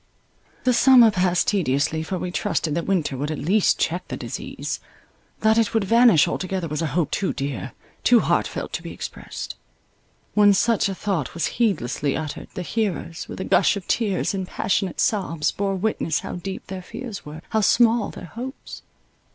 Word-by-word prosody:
The 255 - +3
summer 245 -2 +7
passed 180 -2 +1
tediously, 155 -4 +1
for 185 +4 -3
we 180 0 -4
trusted 175 -5 -1
that 170 - -2
winter 170 -8 0
would 145 +3 -3
at 155 - -3
least 195 +6 +2
check 175 +3 -1
the - - -5
disease. - - -5 0.6
That 220 +1 +4
it 225 0 0
would 220 - +3
vanish 230 -5 +5
altogether 185 -2 -2
was 150 +1 -3
an 165 - 0
hope 155 +3 0
too 195 - 0
dear— 135 -8 -4 0.3
too - - +6
heartfelt, - - -1
to - - -2
be - - -7
expressed. - - -7 0.8
When 205 -1 +6
such 210 +1 +2
a 195 - -3
thought 180 -9 -2
was 170 - 0 0.2
heedlessly 145 - 0
uttered, 155 -2 -5
the 180 - -3
hearers, 185 -5 -3
with - - -7
a - - -3
gush - - +3
of 190 - -7
tears 205 -4 0
and 190 -2 -3
passionate 195 -1 -1
sobs, 165 -7 +1
bore 195 -1 -1
witness 185 -6 -1
how - - -5
deep 190 +2 -6
their 190 -1 -6
fears 220 +2 -7
were, 155 +2 -9
how 220 -1 +1
small 230 +1 +4
their - - -9
hopes. 250 +9 -8
190 Hz, 180 wpm, -23 LUFS, 160-215 Hz, 0.8 s, summer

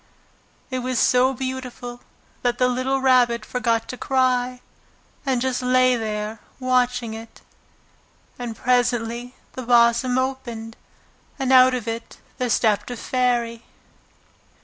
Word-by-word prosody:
It 255 - -1
was 255 0 -2
so 250 +2 +4
beautiful 250 -1 -6 0.4
that 245 -1 0
the 250 - +3
little 255 +2 0
Rabbit 245 -4 +3
forgot 230 -2 0
to 255 - -5
cry, 255 -1 +1 0.7
and 260 -2 +2
just 260 -1 -1
lay 255 0 +4
there 215 -1 -3 0.2
watching 250 -2 +1
it. 225 +1 -10 1.0
And 240 -2 -5
presently 245 -1 0 0.2
the 255 - -6
blossom 240 +1 +3
opened, 240 -4 -3 0.6
and 265 -1 +1
out 255 0 +7
of 240 -3 -5
it 230 0 -5 0.2
there 250 -1 0
stepped 210 -2 +2
a 245 - -5
fairy. 240 -2 0
245 Hz, 125 wpm, -23 LUFS, 235-255 Hz, 1.0 s, out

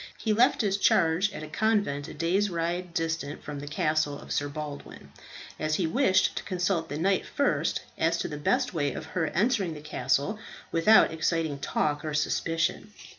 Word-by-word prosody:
He 220 - 0
left 245 +5 +4
his 200 -2 +1
charge 175 +1 +3
at 155 - -7
a - - -6
convent 180 -5 0
a - - -8
day's 180 +6 +1
ride 175 +1 -2
distant 160 -3 -3
from 145 -1 -6
the 145 - -7
castle 150 0 0
of - - -11
Sir 145 0 0
Baldwin, 150 -1 -8 0.5
as 155 0 0
he 180 - 0
wished 190 - +2
to - - -3
consult 175 -3 -1
the 145 - -4
knight 190 +4 +1
first 285 0 0 0.2
as 165 +1 +2
to - - -2
the 150 - -6
best 250 - +1
way 145 -4 0
of - - -6
her 160 0 -2
entering 195 - 0
the - - -8
castle 145 - -1 0.3
without 165 +5 +5
exciting 160 -3 -1
talk 145 +1 -1
or 155 -1 -3
suspicion. 165 +6 -1
165 Hz, 180 wpm, -28 LUFS, 150-190 Hz, 0.5 s, without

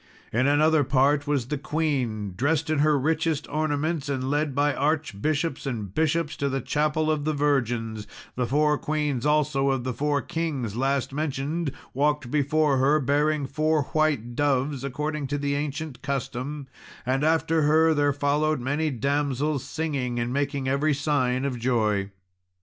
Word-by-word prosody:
In 125 +4 +2
another 150 +1 +4
part, 140 +2 +2
was 140 -5 +1
the 150 - -2
queen 135 - -1
dressed 150 - 0
in 155 - +1
her 150 0 +4
richest 160 +2 0
ornaments, 155 0 -1
and 130 -1 -1
led 145 -2 0
by 145 0 +2
archbishops 150 0 -1
and 105 -7 -4
bishops 160 0 0
to 140 - 0
the 135 0 -1
Chapel 155 +4 0
of 150 -2 -1
the 155 0 0
Virgins, 120 -7 0 0.3
the 125 -1 -1
four 150 +3 +2
queens 150 -3 -1
also 150 -2 +2
of 135 -2 0
the 130 0 -2
four 145 +3 0
kings 145 -10 -3
last 135 +1 0
mentioned 150 +1 -2 0.2
walked 145 -2 0
before 150 -1 +2
her, 140 +4 +3
bearing 145 +1 +1
four 155 +2 +1
white 145 -7 +1
doves, 140 -1 0
according 150 +2 -3
to 145 0 -1
ancient 145 -1 -4
custom; 140 +1 -4 0.4
and 130 +3 0
after 160 0 +2
her 160 +2 +4
there 145 -1 +2
followed 145 +2 +1
many 145 +5 0
damsels, 140 +2 -1
singing 140 -7 -2
and 120 +1 -2
making 140 -1 -1
every 140 +3 +2
sign 135 -3 0
of 130 -3 -2
joy. 110 -5 +1
145 Hz, 155 wpm, -25 LUFS, 130-155 Hz, 0.4 s, another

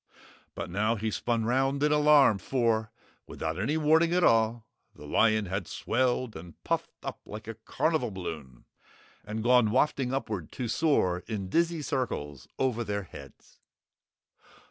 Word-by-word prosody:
But - - -5
now 105 +5 +1
he 110 0 -2
spun 115 +1 -1
round 135 +4 +1
in 150 - +3
alarm, 150 -7 +5
for 115 -3 0 0.4
without 80 +2 -4
any 145 +11 0
warning 160 +2 +3
at 180 - +2
all, 115 -2 +3 0.3
the 75 - -12
lion 110 +7 +2
had 95 -1 -3
swelled 125 -1 -1
and 85 +1 -10
puffed - - -1
up - - -5
like 105 +1 -9
a 115 - -4
carnival 125 +4 -1
balloon 80 - -7 0.6
and 110 +1 -5
gone 125 -2 +4
wafting 130 +1 +1
upward 110 - -3
to 125 - -3
soar 110 - +1
in 100 -5 -4
dizzy 170 - +1
circles 75 - -3
over 125 -3 0
their 100 -1 -3
heads. 70 -6 -14
115 Hz, 145 wpm, -28 LUFS, 100-135 Hz, 0.6 s, alarm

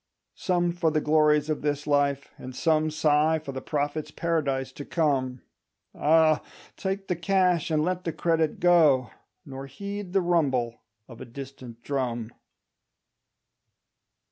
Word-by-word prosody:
Some 175 -2 0
for 170 -1 +1
the 155 0 +1
glories 150 -1 +3
of 155 -1 -2
this 145 0 -1
life, 140 -1 0
and 130 0 -8
some 155 +2 +2
Sigh 155 +1 +2
for 150 -3 -7
the 130 0 -6
Prophet's 145 +1 -2
Paradise 140 -6 -1
to 145 - -8
come: 135 -6 0 0.5
Ah, 155 0 +3 0.3
take 195 0 -3
the 180 - 0
cash 180 -2 +1
and 155 -1 +1
let 180 0 -2
the 165 - -2
credit 160 -1 0
go, 155 -8 +4 0.3
Nor 135 -1 -8
heed 200 +5 -7
the 195 - +3
rumble 135 -9 0 0.3
of 115 - -12
a - - -6
distant 130 -2 -10
drum. 120 -5 -2
150 Hz, 140 wpm, -26 LUFS, 135-170 Hz, 0.5 s, go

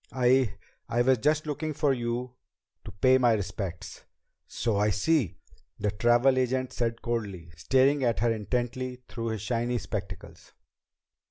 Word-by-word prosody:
"I 125 -4 +2 0.3
I 120 +1 +2
was 130 -1 +3
just 155 +5 +1
looking 155 +1 -3
for 140 -1 +2
you 120 0 -3 0.5
to - - -7
pay 130 +6 +4
my 120 -2 +4
respects." 95 -4 -5 0.4
"So 110 -4 -1
I 105 +1 +2
see," 110 - +1 0.4
the 105 0 -1
travel 120 +5 +3
agent 130 0 -1
said 115 -1 -2
coldly, 100 -8 -4
staring 135 - +2
at 115 -4 +1
her 120 -1 +3
intently 125 +4 -3
through 115 -1 -5
his 110 -3 -3
shiny 120 0 -1
spectacles. 90 -6 -7
120 Hz, 145 wpm, -28 LUFS, 105-130 Hz, 0.5 s, pay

